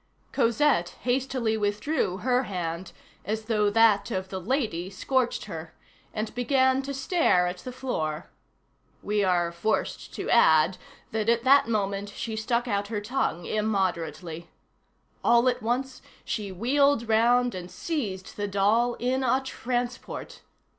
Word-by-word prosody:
Cosette 235 -8 +2
hastily 250 -2 0
withdrew 205 - -1
her 250 +1 +2
hand, 175 -2 -4 0.3
as 215 +3 -3
though 210 -2 +2
that 220 -1 +4
of 185 0 -3
the 190 -1 -5
"lady" 210 - -1
scorched 250 +5 -1
her, 165 -5 -8 0.4
and 215 0 -4
began 260 +1 +2
to 275 +1 -5
stare 270 - +2
at 180 0 -3
the 255 - -7
floor. 160 -12 -3 0.8
We 210 0 +1
are 175 -2 +2
forced 215 +6 -2
to - - -4
add 165 -5 +4 0.3
that 220 0 0
at 235 0 +2
that 275 -1 +6
moment 200 -2 -1
she 220 +2 -5
stuck 235 +2 -1
out 200 -2 -1
her 210 -1 -2
tongue 205 -6 -2
immoderately. 175 -6 -2 0.7
All 235 +1 +4
at 250 -1 +1
once 255 +4 -2 0.2
she 205 -3 -3
wheeled 255 +5 +2
round 240 +2 +3
and 180 -1 -6
seized 205 - -4
the 205 0 -1
doll 215 +5 +2
in 255 +2 -1
a 260 +1 +3
transport. 245 -1 -4
220 Hz, 140 wpm, -27 LUFS, 190-250 Hz, 0.8 s, that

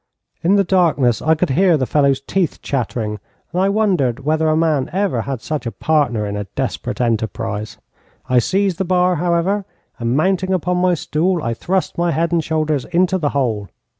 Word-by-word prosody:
In 185 +4 +3
the 200 - +4
darkness 160 - +2
I 160 +1 +3
could 160 -1 0
hear 175 +3 +4
the 130 - 0
fellow's 140 -1 +2
teeth 175 +4 -2
chattering, 115 -5 -2 0.3
and 180 - +1
I 195 - +3
wondered 185 - +1
whether 155 +1 +2
a 155 - +2
man 155 -5 +1
ever 185 - 0
had 135 -1 -4
such 150 -5 -3
a - - -2
partner 135 -10 0
in 100 0 -4
a 105 0 -3
desperate - - -3
enterprise. 110 -2 -2 0.5
I 125 -1 +4
seized 190 - 0
the - - +2
bar, 180 -1 +2
however, 175 +5 +1 0.4
and 120 +2 0
mounting 190 +3 +1
upon 180 0 0
my 180 0 +2
stool, 165 +2 -1
I 115 - -1
thrust 180 +7 -2
my 175 0 +2
head 165 +1 0
and 170 -2 +1
shoulders 155 -4 -1
into 180 +2 +1
the 150 -4 0
hole. 115 -9 -1
155 Hz, 190 wpm, -19 LUFS, 125-180 Hz, 0.5 s, the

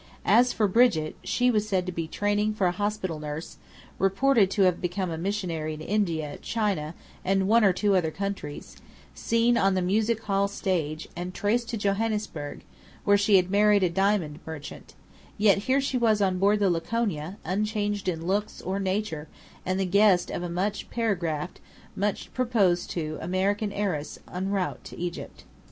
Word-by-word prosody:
As 240 +5 +5
for 215 - +1
Brigit, 195 -7 +3
she 250 0 +2
was 215 -2 0
said 185 -3 +1
to 180 - -3
be 165 -2 -3
training 205 +4 0
for 200 - +1
a 175 - +3
hospital 190 -4 -2
nurse: 150 +2 -6 0.4
reported 195 +2 +3
to 200 0 +2
have 180 -2 +2
become 180 0 -2
a - - -2
missionary 170 -5 -2
in 155 - -10
India, 165 -6 -1
China, 195 -8 -1 0.3
and 190 0 +1
one 230 +2 +5
or 195 - +6
two 200 +2 +1
other 170 -4 +2
countries; 195 -5 -5 0.4
seen 230 +1 +2
on 195 0 +3
the 185 - +1
music 215 +4 +1
hall 200 -1 +1
stage, 165 -6 -2
and 180 +1 -5
traced 230 +3 0
to 230 - -2
Johannesburg, 205 -7 -2 0.4
where 205 - +5
she 200 0 +4
had 185 -1 +3
married 205 0 +4
a 180 - +2
diamond 190 -5 +1
merchant; 155 -2 -9 0.4
yet 205 -2 +4
here 265 +2 +4
she 270 -2 -1
was 220 -3 +3
on 190 -2 +1
board 200 +2 +4
the 200 -3 +2
Laconia, 175 -1 -2
unchanged 205 +2 -1
in 165 -2 -4
looks, 205 +3 -1
or 190 +2 -3
nature, 190 -5 -2 0.4
and 185 +1 0
the 195 - +1
guest 195 -1 +4
of - - -3
a 175 - -4
much 195 +4 -2
paragraphed, 180 -8 -2 0.4
much 205 +1 -2
proposed 210 -9 +1
to 155 -2 -4
American 195 +4 0
heiress 185 -8 -2 0.2
en 185 +2 -2
route 195 -2 -2
to - - -10
Egypt. 175 0 -6
195 Hz, 175 wpm, -26 LUFS, 175-210 Hz, 0.4 s, or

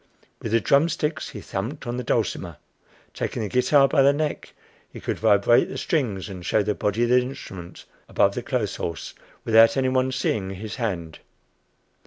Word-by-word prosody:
With 115 - -4
the 115 - +4
drumsticks 150 +5 +1
he 105 - -8
thumped 110 +13 -5
on 120 +1 -3
the 125 - -3
dulcimer. - - -1 0.6
Taking - - -3
the 105 - -3
guitar 135 +4 +4
by 140 0 +3
the 140 +1 +6
neck, 150 +1 -3 0.4
he - - -9
could - - -3
vibrate 105 +4 +4
the - - -6
strings 115 - -1
and 95 -3 -8
show 105 +3 +1
the 105 - 0
body 105 +3 -1
of 120 - +1
the 125 +1 +5
instrument 95 -9 -8 0.2
above 100 - +3
the 125 - -3
clothes 120 -4 -2
horse, 85 -1 -5 0.3
without 115 +2 +6
any 130 -1 +2
one 130 0 +1
seeing 110 -6 -1
his 105 +4 -7
hand! 90 - -4
115 Hz, 180 wpm, -24 LUFS, 100-130 Hz, 0.6 s, the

